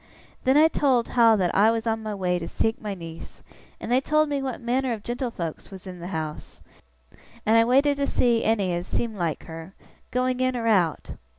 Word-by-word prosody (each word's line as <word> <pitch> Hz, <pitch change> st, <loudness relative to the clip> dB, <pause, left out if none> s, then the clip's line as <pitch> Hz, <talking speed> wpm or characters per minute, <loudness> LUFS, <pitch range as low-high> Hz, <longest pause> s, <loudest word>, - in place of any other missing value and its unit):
Then 265 Hz, +2 st, +4 dB
I 310 Hz, +1 st, +7 dB
told 265 Hz, -7 st, +1 dB
how 230 Hz, -2 st, +5 dB
that 185 Hz, -4 st, 0 dB
I 210 Hz, +3 st, +5 dB
was 225 Hz, 0 st, -1 dB
on 225 Hz, -1 st, -1 dB
my 215 Hz, -1 st, -4 dB
way 180 Hz, -2 st, 0 dB
to 165 Hz, -, -6 dB
seek 225 Hz, 0 st, -1 dB
my 210 Hz, -3 st, -4 dB
niece, 165 Hz, -2 st, -10 dB, 0.4 s
and -, -, -6 dB
they 255 Hz, +2 st, +4 dB
told 305 Hz, +2 st, +2 dB
me 285 Hz, -1 st, -1 dB
what 260 Hz, -3 st, -4 dB
manner 250 Hz, +1 st, 0 dB
of 215 Hz, -3 st, -7 dB
gentlefolks 235 Hz, -, -4 dB
was 190 Hz, -1 st, -11 dB
in 180 Hz, -1 st, -8 dB
the 170 Hz, -, -7 dB
house, 155 Hz, -4 st, -6 dB, 0.9 s
and 220 Hz, -, +4 dB
I 230 Hz, 0 st, +6 dB
waited 275 Hz, +4 st, +3 dB
to 280 Hz, 0 st, 0 dB
see 235 Hz, -2 st, +2 dB
any 200 Hz, -5 st, +1 dB
as 175 Hz, +1 st, -3 dB
seemed 225 Hz, -3 st, -2 dB
like 170 Hz, -4 st, -2 dB
her, 165 Hz, +3 st, -10 dB, 0.3 s
going 255 Hz, 0 st, 0 dB
in 255 Hz, 0 st, +1 dB
or 230 Hz, -, -3 dB
out. 185 Hz, -8 st, +1 dB
225 Hz, 210 wpm, -25 LUFS, 185-255 Hz, 0.9 s, I